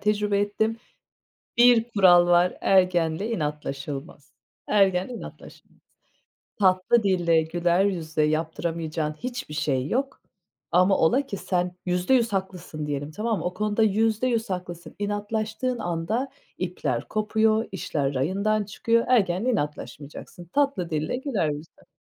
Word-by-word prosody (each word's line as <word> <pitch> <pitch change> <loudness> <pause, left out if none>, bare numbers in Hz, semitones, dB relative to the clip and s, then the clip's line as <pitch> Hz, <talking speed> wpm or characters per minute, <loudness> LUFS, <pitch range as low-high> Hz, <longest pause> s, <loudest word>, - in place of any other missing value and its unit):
tecrübe 210 -1 +1
ettim. 220 +2 0 0.8
Bir 240 -1 +6
kural 175 -3 +6
var 175 +1 +4
ergenle 180 +1 +2
inatlaşılmaz, 150 -3 -5 0.4
ergenle 195 +1 +2
inatlaşılmaz. 235 - -12 0.8
Tatlı 190 +4 +3
dille, 175 -5 +2
güler 175 +3 +1
yüzle 160 -5 -1
yaptıramayacağın 160 0 -1
hiçbir 245 -4 -6
şey 135 -3 0
yok 275 - -2 0.5
ama 185 +2 +4
ola 260 +13 +3
ki 200 - -5
sen 180 -1 -2
%100 205 +6 +2
haklısın 180 -5 -4
diyelim, 145 0 -3
tamam 215 +5 -2
mı? - - -6
O 180 +1 -2
konuda 210 +2 0
%100 225 +2 +1
haklısın, 180 -2 -6
inatlaştığın 215 +4 -2
anda 215 +7 -2 0.3
ipler - - -3
kopuyor, 220 +1 +1
işler 145 -6 -2
rayından 200 +10 0
çıkıyor. 230 +3 +1
Ergenle 210 -1 +2
inatlaşmayacaksın, 150 - -5
tatlı 195 - 0
dille, 155 +7 -1
güler 250 - -1
yüzle. 150 +2 -9
185 Hz, 115 wpm, -25 LUFS, 165-220 Hz, 0.8 s, Bir